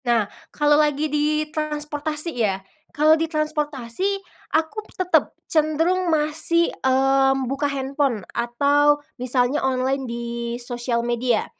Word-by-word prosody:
Nah 235 Hz, -3 st, +3 dB, 0.2 s
kalau 295 Hz, 0 st, +3 dB
lagi 300 Hz, 0 st, +1 dB
di 305 Hz, +1 st, +2 dB
transportasi 300 Hz, +1 st, -2 dB
ya, 215 Hz, -6 st, 0 dB, 0.3 s
kalau 305 Hz, +2 st, +4 dB
di 325 Hz, 0 st, +1 dB
transportasi 305 Hz, +2 st, -1 dB, 0.4 s
aku 320 Hz, +7 st, -2 dB, 0.2 s
tetep 370 Hz, -1 st, +2 dB, 0.2 s
cenderung 325 Hz, +4 st, +1 dB
masih, 320 Hz, +2 st, +1 dB
eee, 270 Hz, +1 st, +3 dB
membuka 270 Hz, +2 st, -1 dB
handphone 270 Hz, -6 st, -1 dB
atau 285 Hz, +5 st, +3 dB, 0.2 s
misalnya 250 Hz, +2 st, +1 dB
online 265 Hz, 0 st, 0 dB
di 235 Hz, 0 st, -4 dB, 0.3 s
sosial 240 Hz, -1 st, -2 dB
media, 240 Hz, -1 st, +1 dB
290 Hz, 115 wpm, -22 LUFS, 250-305 Hz, 0.4 s, kalau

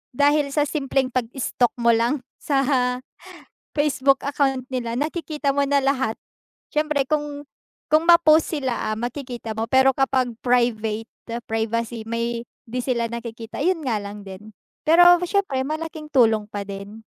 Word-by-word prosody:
dahil 290 Hz, +1 st, +3 dB
sa 290 Hz, +1 st, +1 dB
simpleng 270 Hz, -3 st, -1 dB
pag-stalk 250 Hz, 0 st, -1 dB
mo 235 Hz, -1 st, +3 dB
lang 240 Hz, +4 st, +1 dB, 0.2 s
sa 275 Hz, -2 st, +1 dB, 1.1 s
Facebook 275 Hz, -2 st, +2 dB
account 270 Hz, -2 st, 0 dB
nila, 235 Hz, -1 st, -2 dB
nakikita 300 Hz, -1 st, -2 dB
mo 280 Hz, -, +1 dB
na 285 Hz, -, +4 dB
lahat. 265 Hz, -5 st, 0 dB, 0.6 s
Siyempre 300 Hz, -2 st, +1 dB
kung 295 Hz, 0 st, -2 dB, 0.4 s
kung 315 Hz, +2 st, +2 dB
ma-post 325 Hz, -2 st, +6 dB
sila, 255 Hz, -7 st, -2 dB
makikita 240 Hz, -1 st, -5 dB
mo. 225 Hz, +1 st, -3 dB
Pero 265 Hz, +1 st, +5 dB
kapag 260 Hz, -2 st, +1 dB
private, 225 Hz, -3 st, +1 dB, 0.4 s
privacy 225 Hz, +1 st, -2 dB
may 235 Hz, 0 st, -2 dB, 0.2 s
'di 250 Hz, +1 st, -3 dB
sila 240 Hz, -2 st, 0 dB
nakikita. 230 Hz, +1 st, -6 dB
'Yun 330 Hz, -3 st, 0 dB
nga 220 Hz, -4 st, 0 dB
lang 205 Hz, 0 st, -8 dB
din, 200 Hz, +2 st, -11 dB, 0.2 s
pero 350 Hz, +2 st, +6 dB
siyempre, 360 Hz, -7 st, 0 dB
malaking 310 Hz, +1 st, -5 dB
tulong 225 Hz, -6 st, +3 dB
pa 205 Hz, -1 st, -5 dB
din. 200 Hz, +2 st, -8 dB
260 Hz, 135 wpm, -23 LUFS, 230-290 Hz, 1.1 s, ma-post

